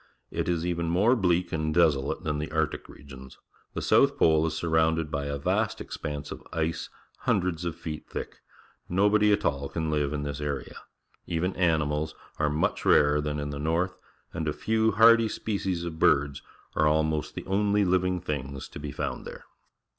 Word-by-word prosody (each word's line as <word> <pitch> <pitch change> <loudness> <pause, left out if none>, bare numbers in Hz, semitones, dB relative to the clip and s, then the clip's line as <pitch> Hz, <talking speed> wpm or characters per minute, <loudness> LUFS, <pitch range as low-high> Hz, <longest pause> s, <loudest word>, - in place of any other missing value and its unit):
It - - -2
is 85 -1 0
even 85 -1 -1
more 100 +9 +4
bleak 90 -5 +1
and 80 -1 -1
desolate 75 -5 +2
than 75 -1 -1
the 75 - -4
Arctic 80 -1 -1
regions. 65 -2 -12 0.4
The - - -3
south - - +4
pole 80 0 +4
is 80 - -3
surrounded 80 -1 +1
by 70 0 -2
a 70 0 -2
vast 70 - 0
expanse 75 -1 -6
of - - -7
ice 80 0 -2 0.3
hundreds 90 -2 0
of 85 -1 -2
feet 75 -2 -7
thick. - - -6 0.5
Nobody 105 +3 +4
at 100 - +1
all 70 0 -1
can 80 -2 -2
live 75 -2 0
in 75 -1 -3
this 70 0 -4
area. 70 -3 -4 0.5
Even 90 +2 -1
animals 80 -3 +1 0.2
are 75 0 +2
much 75 +2 0
rarer 75 0 +4
than 75 0 -2
in 70 0 -3
the 70 - -5
north, 85 +5 0 0.4
and 80 -1 -3
a 75 - 0
few 110 0 +1
hardy 115 +1 +6
species 95 -6 -2
of 80 -2 -6
birds 70 -1 +3 0.3
are 75 - +3
almost 80 0 0
the - - -6
only 100 +1 +2
living 90 0 +1
things 70 -5 -5
to - - -9
be 75 -1 -5
found - - -4
there. - - -10
80 Hz, 180 wpm, -27 LUFS, 75-90 Hz, 0.5 s, hardy